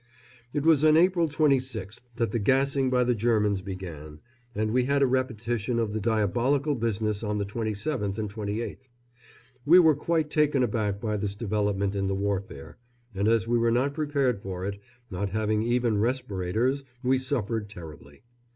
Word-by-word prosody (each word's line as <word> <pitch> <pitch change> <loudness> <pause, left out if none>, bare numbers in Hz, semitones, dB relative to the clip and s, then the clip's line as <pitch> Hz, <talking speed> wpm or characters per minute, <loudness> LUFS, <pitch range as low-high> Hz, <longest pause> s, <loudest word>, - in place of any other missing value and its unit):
It 145 0 -2
was 160 -3 +5
on 155 0 +6
April 170 -1 +3
26th 130 -9 0
that 115 -1 -1
the 115 - -1
gassing 135 +4 +2
by 125 -1 +3
the 125 0 +2
Germans 105 -3 +1
began, 85 -6 -8 0.4
and 110 +1 0
we 125 +1 +2
had 140 +1 +2
a - - +6
repetition 120 -2 -1
of 110 -3 -1
the 110 - -1
diabolical 120 +7 +1
business 110 -3 -1
on 105 -2 -2
the 100 - -1
27th 105 +1 -3
and 110 -1 -2
28th. 110 +5 -5 0.7
We 165 +5 +7
were 160 -3 +7
quite 155 0 -1
taken 150 -3 +2
aback 105 -3 -1
by 105 -1 -2
this 100 -1 -3
development 100 -2 -1
in 100 -1 -1
the 95 - -1
warfare, 100 - -4 0.3
and 100 +2 0
as 115 0 +2
we 120 0 +2
were 115 0 +2
not 130 +4 +1
prepared 140 -7 0
for 95 -2 -5
it, 100 0 -5 0.3
not 100 +2 -2
having 110 +1 0
even 120 -2 +1
respirators, 115 +2 -1 0.2
we 130 +1 +2
suffered 115 -6 -2
terribly. 75 -6 -12
115 Hz, 170 wpm, -27 LUFS, 100-130 Hz, 0.7 s, We